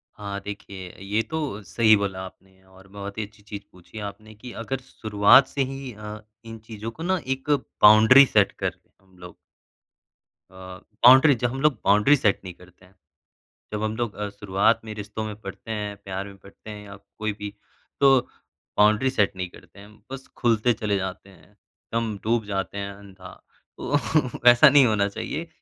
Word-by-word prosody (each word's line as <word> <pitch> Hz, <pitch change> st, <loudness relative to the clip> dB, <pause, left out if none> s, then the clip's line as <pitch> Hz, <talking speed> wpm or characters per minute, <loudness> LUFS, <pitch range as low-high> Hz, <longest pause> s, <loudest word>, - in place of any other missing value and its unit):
हाँ, 100 Hz, -1 st, -6 dB
देखिए 100 Hz, -2 st, -8 dB
ये 105 Hz, +3 st, 0 dB
तो 145 Hz, -10 st, -3 dB
सही 110 Hz, +4 st, +4 dB
बोला 100 Hz, -2 st, -3 dB
आपने 95 Hz, 0 st, -16 dB
और 95 Hz, +1 st, -19 dB
बहुत 100 Hz, +1 st, -9 dB
ही 110 Hz, -, -2 dB
अच्छी 105 Hz, 0 st, -21 dB
चीज़ 105 Hz, -1 st, -8 dB
पूछी 90 Hz, +4 st, -13 dB
आपने 110 Hz, +2 st, -15 dB
कि 125 Hz, +3 st, -11 dB
अगर 130 Hz, +3 st, -3 dB
शुरुआत 110 Hz, +1 st, +4 dB
से 140 Hz, -, -3 dB
ही 135 Hz, -1 st, -7 dB
अ, 105 Hz, 0 st, -9 dB, 0.3 s
इन 115 Hz, 0 st, -9 dB
चीज़ों 110 Hz, 0 st, -7 dB
को 160 Hz, -, -9 dB
ना 185 Hz, +2 st, +1 dB
एक 135 Hz, +2 st, -4 dB, 0.3 s
बाउंड्री 110 Hz, +6 st, +8 dB
सेट 105 Hz, -6 st, +2 dB
कर -, -, -4 dB, 0.2 s
हम 95 Hz, -1 st, -26 dB
लोग। 90 Hz, -1 st, -12 dB, 1.2 s
अ, -, -, -21 dB, 0.5 s
बाउंड्री 130 Hz, +3 st, +8 dB
ज 120 Hz, -, 0 dB
हम 135 Hz, +3 st, -2 dB
लोग 150 Hz, -2 st, +4 dB
बाउंड्री 105 Hz, +8 st, +5 dB
सेट 105 Hz, -7 st, +1 dB
नहीं 90 Hz, -, -8 dB
करते 90 Hz, +1 st, -20 dB
हैं। 95 Hz, +2 st, -24 dB, 0.8 s
जब 105 Hz, +1 st, -3 dB
हम 110 Hz, 0 st, -2 dB
लोग 120 Hz, -3 st, -3 dB
अ, 105 Hz, 0 st, -4 dB
शुरुआत 100 Hz, +1 st, 0 dB
में 110 Hz, -, -6 dB
रिश्तों 105 Hz, +1 st, -6 dB
में 105 Hz, -1 st, -6 dB
पड़ते 100 Hz, +3 st, -9 dB
हैं, 105 Hz, -1 st, -4 dB
प्यार 95 Hz, +1 st, -5 dB
में 100 Hz, -1 st, -13 dB
पड़ते 100 Hz, +3 st, -15 dB
हैं 105 Hz, -1 st, -9 dB
या 100 Hz, 0 st, -11 dB, 0.2 s
कोई 110 Hz, -1 st, -2 dB
भी 105 Hz, 0 st, -6 dB, 0.5 s
तो 135 Hz, -2 st, +6 dB, 0.6 s
बाउंड्री 105 Hz, +5 st, +4 dB
सेट 105 Hz, -7 st, 0 dB
नहीं 90 Hz, -1 st, -5 dB
करते 90 Hz, +2 st, -17 dB
हैं। 100 Hz, +1 st, -14 dB, 0.2 s
बस 135 Hz, 0 st, -8 dB
खुलते 120 Hz, 0 st, +2 dB
चले 105 Hz, -2 st, -2 dB
जाते 95 Hz, +1 st, -6 dB
हैं, 95 Hz, +2 st, -21 dB, 0.4 s
दम 115 Hz, -3 st, -2 dB
डूब 115 Hz, -1 st, 0 dB
जाते 100 Hz, 0 st, -4 dB
हैं 100 Hz, 0 st, -4 dB
अंधा 95 Hz, -2 st, -14 dB, 0.4 s
तो 145 Hz, -, 0 dB, 0.5 s
ऐसा 120 Hz, +5 st, +7 dB
नहीं 140 Hz, -2 st, +6 dB
होना 105 Hz, -3 st, +1 dB
चाहिए 165 Hz, +10 st, -5 dB
105 Hz, 185 wpm, -24 LUFS, 100-120 Hz, 1.2 s, बाउंड्री